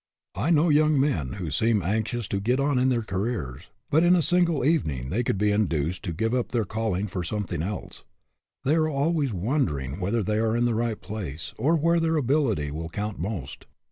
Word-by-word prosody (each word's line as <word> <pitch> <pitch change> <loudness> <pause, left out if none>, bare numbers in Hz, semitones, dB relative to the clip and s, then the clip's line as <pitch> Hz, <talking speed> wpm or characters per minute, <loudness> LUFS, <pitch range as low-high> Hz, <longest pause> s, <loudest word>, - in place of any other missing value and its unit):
I 105 - -1
know 165 0 +4
young 150 -1 +4
men 85 - 0
who 90 -6 -5
seem 110 +5 +2
anxious 110 +4 -1
to 100 - -1
get 125 +6 +1
on 140 -2 +2
in 130 +1 +3
their 120 -3 +1
careers, 95 - -3 0.2
but 160 +3 +4
in 175 +1 +6
a 170 - +3
single 170 -3 +2
evening 75 - 0
they 115 - +1
could 105 - 0
be 105 +1 +2
induced 90 -5 0
to 90 - -2
give 115 +7 -1
up 125 -1 -1
their 115 -4 0
calling 110 -2 -1
for 90 -3 -4
something 90 -2 -3
else. 100 +3 -5 0.6
They 140 - +2
are 155 -1 +2
always 145 -1 0
wonder 105 - 0
ing 65 +6 -6
whether 105 +4 0
they 105 +2 0
are 110 +1 +1
in 120 - +2
the 120 - +1
right 115 -1 -1
place, 85 -9 -6
or 145 +9 +2
where 170 +2 +3
their 165 0 +1
ability 125 - +1
will 80 +2 -5
count 105 +2 -4
most. 85 -7 -5
110 Hz, 210 wpm, -26 LUFS, 90-140 Hz, 0.6 s, in